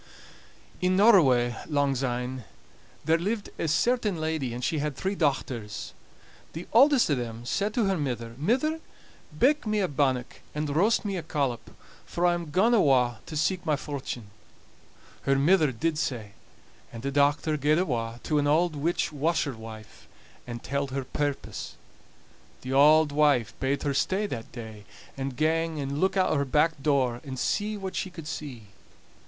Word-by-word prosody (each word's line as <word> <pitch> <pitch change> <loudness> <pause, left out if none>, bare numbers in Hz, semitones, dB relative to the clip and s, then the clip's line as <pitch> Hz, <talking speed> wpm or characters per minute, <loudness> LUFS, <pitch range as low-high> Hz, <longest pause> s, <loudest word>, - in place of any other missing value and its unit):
In 180 0 +2
Norroway, 135 - +5
langsyne, 130 -3 -1 0.6
there 165 +1 +3
lived 205 +4 -3
a - - 0
certain 210 +5 +1
lady, 155 -5 -2
and 120 +1 -6
she 155 +4 0
had 150 -1 -2
three 190 +7 -2
dochters. 130 - -2 0.6
The 165 +3 -7
auldest 265 - +5
o' - - +5
them 120 -2 -4
said 205 +11 0
to 235 - +2
her 195 -3 0
mither: 120 -5 -3
"Mither, 260 - +1 0.6
bake 280 - +3
me 215 0 +1
a 190 - +1
bannock, 130 -4 -1
and 150 -1 -2
roast 210 +7 +3
me 200 -2 -2
a - - -3
collop, 140 -7 -2 0.3
for 175 - -2
I'm 175 -2 +1
gaun 195 +10 +3
awa' 130 - +3
to 155 - -5
seek 180 +4 0
my 155 -4 +1
fortune." 130 -7 -6 0.9
Her 135 - +2
mither 155 +1 +4
did 155 +6 -1
sae; 115 -9 -3 0.6
and 115 -1 -9
the 140 - -2
dochter 145 +2 +2
gaed 150 +1 +2
awa' 120 -9 -2
to 150 -2 +1
an 145 - +1
auld 160 +2 +2
witch 160 +3 -1
washerwife 125 -8 -3 0.4
and 120 -1 -6
telled 140 +1 -2
her 135 0 -3
purpose. 145 +2 -4 0.9
The 130 +1 -4
auld 150 +2 +6
wife 145 -6 +2
bade 135 +2 -1
her 145 - 0
stay 190 +9 0
that 115 - -6
day, 110 -4 -9 0.3
and 135 -1 -4
gang 160 0 0
and 140 +1 -3
look 190 +1 +2
out 185 - +3
o' - - +2
her 140 - +1
back 150 +2 +1
door, 130 -5 +1
and 135 -3 -7
see 210 - -1
what 190 -2 -6
she 190 - -2
could 165 -3 -10
see. 135 -9 -7
145 Hz, 165 wpm, -27 LUFS, 130-175 Hz, 0.9 s, auld